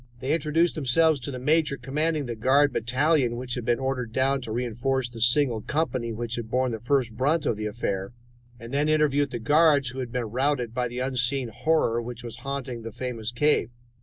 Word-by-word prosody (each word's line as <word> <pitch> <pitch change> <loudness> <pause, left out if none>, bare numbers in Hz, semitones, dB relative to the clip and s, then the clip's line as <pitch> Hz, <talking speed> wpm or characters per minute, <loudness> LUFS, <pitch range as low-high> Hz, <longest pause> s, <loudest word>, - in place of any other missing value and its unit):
They 130 +4 -1
introduced 165 +1 +2
themselves 155 +2 +2
to 130 - -5
the 130 - -5
major 150 +2 +1
commanding 150 +4 -1
the 120 - -4
guard 135 +6 +3
battalion 130 +1 +1
which 125 0 -3
had 120 -2 -3
been 120 0 +2
ordered 130 -3 -2
down 135 +3 +1
to 115 - -7
reinforce 125 +3 -1
the 115 -2 -10
single 120 -1 +3
company 130 -6 -1
which 120 +1 -4
had 115 -2 -5
borne 130 +1 +1
the 110 - -4
first 120 -1 0
brunt 150 +6 +1
of 115 - +1
the 105 0 -3
affair, 100 -3 -3 0.5
and 115 +3 -9
then 145 +2 +1
interviewed 145 -2 +2
the 120 - -4
guards 145 +2 +4
who 130 +2 -7
had 125 -2 -4
been 125 -1 -2
routed 125 -2 0
by 125 0 0
the 120 +1 -8
unseen 130 0 0
horror 120 -1 +1
which 120 +1 -7
was 120 -2 -7
haunting 135 -4 -5
the 115 0 -7
famous 120 -1 -4
cave. 145 -2 +2
125 Hz, 205 wpm, -26 LUFS, 120-145 Hz, 0.5 s, guards